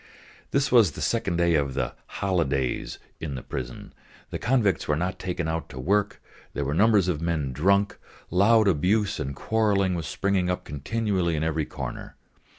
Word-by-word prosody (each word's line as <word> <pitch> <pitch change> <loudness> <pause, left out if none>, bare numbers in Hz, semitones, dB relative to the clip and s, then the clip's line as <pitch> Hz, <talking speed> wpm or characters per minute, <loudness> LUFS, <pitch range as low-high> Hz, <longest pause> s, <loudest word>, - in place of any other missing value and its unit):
This 140 0 +1
was 115 - +5
the - - -9
second 95 +1 0
day 85 -1 +3
of 70 -4 +1
the - - -1
"holidays" 70 -10 -1 0.2
in 75 -4 -4
the 65 - -6
prison; 65 -2 -6 0.4
the - - -3
convicts 110 -8 +1
were 75 - +2
not 90 +4 -2
taken 90 -2 -3
out 80 0 -3
to 65 - -8
work, 100 +8 +1 0.4
there 70 - -1
were 70 - -1
numbers 105 +1 +4
of 85 -4 -1
men 80 -6 -1
drunk, 100 +8 +2 0.3
loud 105 +4 +5
abuse 95 +5 +2
and 70 +1 -3
quarrelling 100 -3 +1
was 85 -3 -3
springing 95 0 0
up 90 - -2
continually 90 +3 -1
in 75 - -1
every 80 -1 0
corner. - - -7
90 Hz, 170 wpm, -26 LUFS, 75-100 Hz, 0.4 s, was